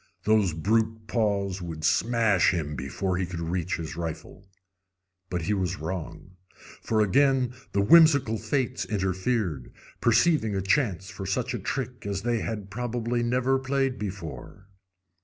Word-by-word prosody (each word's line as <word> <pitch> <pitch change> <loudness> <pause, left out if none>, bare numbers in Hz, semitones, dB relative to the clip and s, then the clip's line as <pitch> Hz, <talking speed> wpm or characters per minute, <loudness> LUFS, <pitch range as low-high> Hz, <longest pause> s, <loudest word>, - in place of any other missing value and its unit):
Those 105 -5 +3
brute 110 +6 0
paws 100 -4 0
would 80 -3 -6
smash 115 0 +3
him 75 -4 -3
before 90 +8 -2
he 90 - 0
could 85 -2 -6
reach 85 +1 -2
his 80 0 -6
rifle. 85 +3 -7 0.8
But 90 -2 -2
he 105 - 0
was 95 -1 -1
wrong, 90 0 -6 0.4
for 110 -1 +1
again 130 +3 +3 0.2
the 100 - +1
whimsical 140 -2 +6
Fates 130 -2 -1
interfered, 95 - -1 0.3
perceiving 120 -2 +3
a 95 - 0
chance 100 - 0
for 95 -2 -6
such 125 +6 -1
a 120 - -3
trick 125 +2 -4
as 100 -1 -3
they 120 -1 +1
had 105 -3 -5
probably 120 +1 -2
never 125 +3 +1
played 135 -1 -1
before. 95 -1 -7
105 Hz, 140 wpm, -27 LUFS, 90-120 Hz, 0.8 s, whimsical